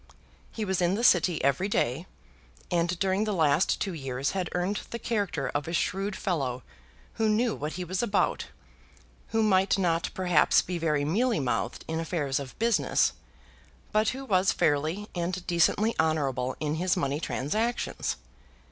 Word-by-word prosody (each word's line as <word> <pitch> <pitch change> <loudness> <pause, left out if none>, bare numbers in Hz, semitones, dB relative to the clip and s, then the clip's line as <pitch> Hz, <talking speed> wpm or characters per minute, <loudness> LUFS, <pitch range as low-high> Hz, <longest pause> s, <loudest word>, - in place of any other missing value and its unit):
He 220 - -3
was 190 -2 0
in 175 +2 +2
the 230 - -2
City 175 -6 +4
every 140 +8 +2
day; 145 0 0 0.6
and 175 0 +1
during 190 +2 +1
the 210 - -1
last 160 +1 +2
two 195 - -2
years 135 -3 -2
had 185 -3 -2
earned 180 +3 0
the 235 - -4
character 210 -5 -2
of 145 +1 -2
a 165 - -4
shrewd 195 +3 -1
fellow 135 - -2 0.6
who 220 - +3
knew 225 +1 +2
what 150 +2 -4
he 180 - -4
was 185 +2 -2
about, 215 -4 0 0.8
who 225 0 +1
might 195 -2 +3
not 170 -3 +1
perhaps 180 -5 +4
be 180 -1 -4
very 150 -3 +1
mealy 225 - +1
mouthed 130 -3 -2
in 160 0 -2
affairs 155 -5 -1
of 135 -2 -8
business, 230 0 +2 0.8
but 215 +1 +3
who 270 +1 -5
was 190 -5 +3
fairly 160 +8 0
and 180 +1 -3
decently 190 +6 +2
honourable 135 -6 0
in 150 -1 -1
his 180 -1 +1
money 140 +1 -1
transactions. 215 - -2
175 Hz, 160 wpm, -28 LUFS, 150-200 Hz, 0.8 s, City